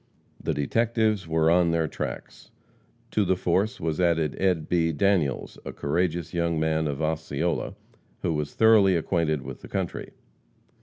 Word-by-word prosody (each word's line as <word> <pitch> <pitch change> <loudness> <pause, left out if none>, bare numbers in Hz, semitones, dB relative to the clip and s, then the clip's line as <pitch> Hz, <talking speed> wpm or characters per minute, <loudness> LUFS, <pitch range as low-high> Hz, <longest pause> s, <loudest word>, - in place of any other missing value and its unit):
The - - -1
detectives 110 - +1
were 80 0 +2
on 85 0 +4
their 85 -1 +1
tracks. - - -7 0.6
To 105 - +2
the 95 -1 +2
force 95 +4 0
was 80 +1 -2
added 80 -4 +1
Ed. 90 -5 +1
B. 85 -2 +2
Daniels, 80 -3 0
a - - -6
courageous 85 +2 -1
young 85 -2 0
man 80 0 +1
of 75 +1 -3
Osceola, 80 +1 -2 0.5
who 85 - +1
was 75 -1 -3
thoroughly 110 -4 +5
acquainted 80 -4 0
with - - -8
the - - -10
country. - - -4
85 Hz, 150 wpm, -26 LUFS, 80-90 Hz, 0.6 s, thoroughly